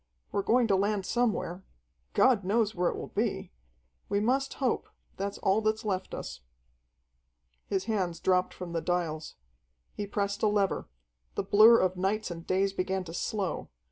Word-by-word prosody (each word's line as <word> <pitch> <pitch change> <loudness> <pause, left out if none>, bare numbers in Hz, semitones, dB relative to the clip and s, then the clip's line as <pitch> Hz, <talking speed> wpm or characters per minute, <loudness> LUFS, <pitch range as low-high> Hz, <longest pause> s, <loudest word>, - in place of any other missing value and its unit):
"We're 200 - 0
going 240 +4 +3
to 200 -3 +3
land 200 0 0
somewhere. 210 -6 0 0.5
God 235 -6 +4
knows 215 +3 +1
where 175 -2 +1
it - - -4
will - - -6
be. - - -1 0.6
We 200 - +2
must 265 +6 +1
hope 260 -4 -1 0.3
that's 200 +1 -3
all 195 +3 +2
that's 215 0 0
left 190 -2 -2
us." - - -6 1.3
His 190 -1 0
hands 190 -6 -1
dropped 185 0 +2
from 180 -2 -7
the 165 - -1
dials. 165 -3 -2 0.6
He 205 - -4
pressed 200 0 -2
a 215 - +4
lever. 205 -2 0 0.5
The - - -1
blur 215 +4 +7
of 185 0 +1
nights 195 +2 -1
and 165 0 -8
days 195 +1 +1
began 190 0 -1
to 165 -2 -9
slow. 195 +1 -2
195 Hz, 165 wpm, -29 LUFS, 185-215 Hz, 1.3 s, blur